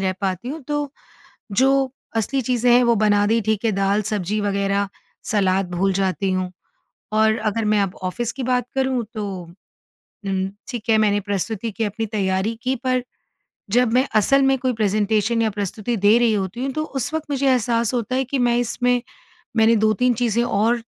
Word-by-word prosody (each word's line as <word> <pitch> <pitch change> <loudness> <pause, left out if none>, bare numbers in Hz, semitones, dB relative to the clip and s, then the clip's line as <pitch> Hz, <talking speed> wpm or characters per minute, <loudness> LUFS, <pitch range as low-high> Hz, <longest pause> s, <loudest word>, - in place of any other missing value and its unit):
रह 190 -1 0
पाती 195 +5 -2
हूँ। 310 +3 -5
तो, 295 -1 -2 0.6
जो 270 +3 +3 0.2
असली 265 +5 0
चीज़ें 245 0 +1
हैं, 245 - +6
वो 235 - +4
बना 205 -1 +3
दी 225 +2 +2
ठीक 220 +1 -1
है, 225 - +3
दाल-सब्ज़ी 200 0 0
वगैरह 200 0 0 0.4
सलाद 190 -3 +1
भूल 195 +2 +1
जाती 190 0 0
हूँ। 185 -1 -1 0.6
और 220 0 +3
अगर 215 +1 -1
मैं 210 0 +3
अब 195 -2 -2
ऑफ़िस 235 +6 -2
की 270 - -6
बात 250 0 0
करूँ 265 -2 0
तो 215 -2 -3 1.0
उम, 190 0 0 0.2
ठीक 235 -3 -6
है, 220 - +5
मैंने 205 -1 +3
प्रस्तुति 205 +3 -3
की 225 - -3
अपनी 215 +2 -2
तैयारी 200 +1 -1
की, 260 +1 0
पर 255 0 -1 0.7
जब 240 0 +3
मैं 255 +2 +3
असल 275 +6 +4
में 270 0 +3
कोई 255 0 0
प्रेजेंटेशन 215 +1 +1
या 220 - +1
प्रस्तुति 210 +3 -3
दे 205 +3 +4
रही 235 -2 +3
होती 200 +6 -3
हूँ, 270 - -2
तो 310 +2 -2
उस 270 -1 -4
वक़्त 315 -2 -3
मुझे 275 0 0
एहसास 235 -2 +1
होता 245 +1 -1
है 265 - +1
कि 270 +2 -2
मैं 240 -1 +2
इसमें 245 +1 +1 0.6
मैंने 225 +1 +5
2-3 220 +3 +2
चीज़ें 235 0 +1
और 230 +2 +1
225 Hz, 185 wpm, -21 LUFS, 205-250 Hz, 1.0 s, हैं